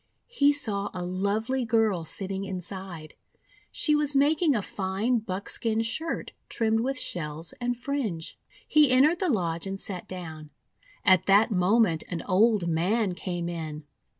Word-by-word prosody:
He 285 -10 +5
saw 215 -9 +1
a 180 -1 -3
lovely 210 +8 -1
girl 220 -7 +1
sitting 195 +3 -3
inside. 185 -4 -6 0.6
She 300 - +2
was 295 -1 +2
making 295 +2 +3
a 210 - -1
fine 200 +7 -1
buckskin 220 +2 -2
shirt 315 +9 -3 0.2
trimmed 225 -1 +1
with 265 +3 -1
shells 160 -3 -3
and 245 0 -1
fringe. 235 - -3 0.3
He 300 -3 +5
entered 285 +7 +4
the 370 - 0
lodge 170 - -1
and 195 0 -4
sat 185 -3 -5
down. 160 -5 -8 0.6
At 185 -3 +5
that 205 +3 +5
moment 185 -2 +2
an 170 -2 -4
old 205 -1 +3
man 185 +5 +1
came 175 -1 -4
in. 160 -3 -5
200 Hz, 145 wpm, -27 LUFS, 180-240 Hz, 0.6 s, He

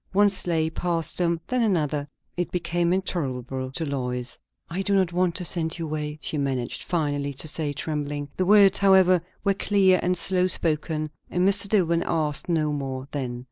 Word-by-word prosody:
One 205 +1 +4
sleigh 165 -4 0
passed 170 -1 -2
them, 170 -1 +1
then 250 -1 0
another. 150 -9 0 0.3
It 175 0 -2
became 170 -1 0
intolerable 130 -8 -2
to 165 +3 -2
Lois. 125 -3 -2 0.3
"I 175 +3 -3
do 200 +1 +1
not 185 -3 +2
want 180 -1 +1
to 180 - -2
send 165 -1 0
you 165 - -4
away," 150 -1 -4
she 150 - -2
managed 130 -3 -2
finally 145 -4 -1
to 155 - -1
say, 155 -1 -1
trembling. 145 0 -4
The 185 - -1
words, 200 -1 +6
however, 190 -2 +5 0.2
were 200 -1 +3
clear 195 -2 +3
and 180 +1 0
slow 185 +1 +2
spoken, 155 -2 0 0.2
and 180 +1 +1
Mr. 200 0 +3
Dillwyn 170 -5 +2
asked 155 -1 0
no 155 -3 +1
more 135 -2 -4
then. 125 -4 -3
165 Hz, 180 wpm, -25 LUFS, 145-185 Hz, 0.3 s, words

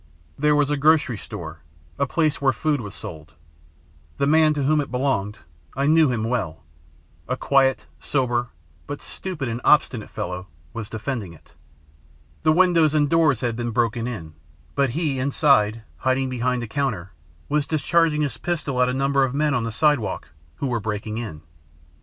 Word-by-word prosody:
"There 150 +1 +2
was 145 0 +2
a 145 - +1
grocery 150 -3 +3
store 80 -1 -8 0.4
a 140 - +2
place 155 0 0
where 135 -1 +4
food 145 +3 0
was 105 -2 -8
sold. 80 -3 -9 0.8
The - - +1
man 155 +1 +4
to 145 - -1
whom 150 +2 +3
it 140 - -6
belonged 125 -6 -1 0.4
I 135 +2 0
knew 155 -2 +5
him 115 -3 -1
well 110 -10 -2 0.6
a - - -1
quiet, 135 -1 +2
sober, 120 -3 0 0.4
but 145 0 -5
stupid 175 -9 -5
and 115 +1 -3
obstinate 130 -7 +3
fellow, 90 +1 -5 0.3
was 110 -3 -6
defending 110 -5 -4
it. 80 - -19 0.9
The 155 - +4
windows 165 -3 +4
and 145 -2 +2
doors 155 -7 +3
had 120 -3 -1
been 120 0 -2
broken 115 0 0
in, 85 -11 -6 0.4
but 140 -1 +2
he, 145 0 -1
inside, 130 -6 +2
hiding 130 0 0
behind 125 0 -1
a - - -5
counter, 110 -8 -2 0.4
was 150 0 0
discharging 155 0 +2
his 125 -6 -3
pistol 150 -6 -1
at 125 - +3
a 125 - -1
number 135 0 +2
of 130 0 -1
men 150 0 +2
on 120 -4 0
the 115 - -3
sidewalk 115 - +1 0.3
who - - -4
were 120 -2 0
breaking 110 +1 -4
in. 80 -10 -7
130 Hz, 170 wpm, -23 LUFS, 115-150 Hz, 0.9 s, knew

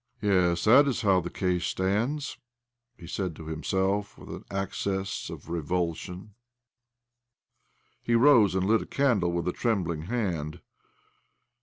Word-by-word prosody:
" - - -40
Yes, 90 -4 +2
that 130 +6 +6
is 135 - -1
how 95 -3 +4
the 85 - -5
case 90 -1 -1
stands," 115 +11 -1 0.6
he 85 - -12
said 90 -1 -3
to 80 - -10
himself 95 +6 -1
with - - -13
an - - -7
access 95 0 -3
of - - -9
revulsion. 85 +3 -3 1.7
He 120 - +1
rose 115 -6 +5
and 95 0 +1
lit 110 +3 +3
a - - -8
candle 115 -11 +1
with 85 0 -2
a 90 - 0
trembling 85 -9 -1
hand. 90 -11 -2
95 Hz, 140 wpm, -27 LUFS, 85-110 Hz, 1.7 s, that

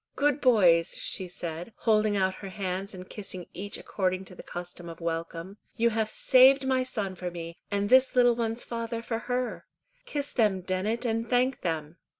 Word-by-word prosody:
good 290 0 +2
boys," 185 -9 +5
she 185 - -4
said, 175 +3 -6
holding 215 -2 +2
out 190 -1 +2
her 195 - -6
hands 190 0 -4
and 185 0 -9
kissing 185 -4 -7
each 200 +2 -4
according 185 -1 -2
to 185 - -11
the - - -10
custom 175 0 -7
of 165 - -9
welcome, 170 +3 -4 0.2
"you 235 +1 +3
have 220 -1 0
saved 265 +4 +6
my 260 -1 +2
son 215 -7 -3
for 180 -1 -4
me, 170 -1 -7
and 205 0 0
this 260 +1 +5
little 245 -1 +5
one's 230 0 -2
father 230 0 -4
for 225 -1 -2
her. 250 0 -2 0.4
Kiss 285 -1 -3
them, 210 -6 +2
Dennet, 190 +7 -1
and 230 0 -1
thank 250 +1 +2
them." 160 -1 -3
205 Hz, 180 wpm, -28 LUFS, 180-235 Hz, 0.4 s, saved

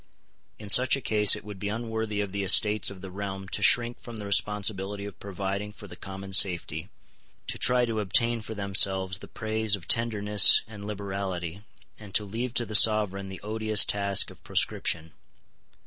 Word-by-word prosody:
In 105 - -12
such 125 +6 +4
a - - -5
case 105 -5 +5
it - - -11
would 105 -2 -10
be 100 - -4
unworthy 110 -1 -4
of 100 -2 -6
the 100 +1 -4
Estates 105 +2 +3
of 95 -2 -12
the 95 -1 -10
Realm 95 0 -7
to 100 - -1
shrink 120 +3 +2
from 120 -2 -11
the 105 - -8
responsibility 100 0 -1
of 100 - -11
providing 100 +1 -6
for 105 - -14
the 90 - -12
common 95 +1 -10
safety, 90 -2 +1 0.6
to - - -3
try 125 0 +2
to 115 -2 -4
obtain 115 +3 +1
for 110 +1 -9
themselves 95 -1 +1
the - - -12
praise 110 -1 -1
of 90 -3 -13
tenderness 105 -3 +4
and 105 -2 -11
liberality, 95 -3 -6 0.4
and 105 -3 -13
to 105 - +3
leave 115 +4 -6
to 120 - -1
the 110 - -9
Sovereign 105 -3 +4
the 95 - -10
odious 110 0 +3
task 100 -1 +1
of - - -19
proscription. 80 -1 -1
100 Hz, 180 wpm, -25 LUFS, 95-110 Hz, 0.6 s, case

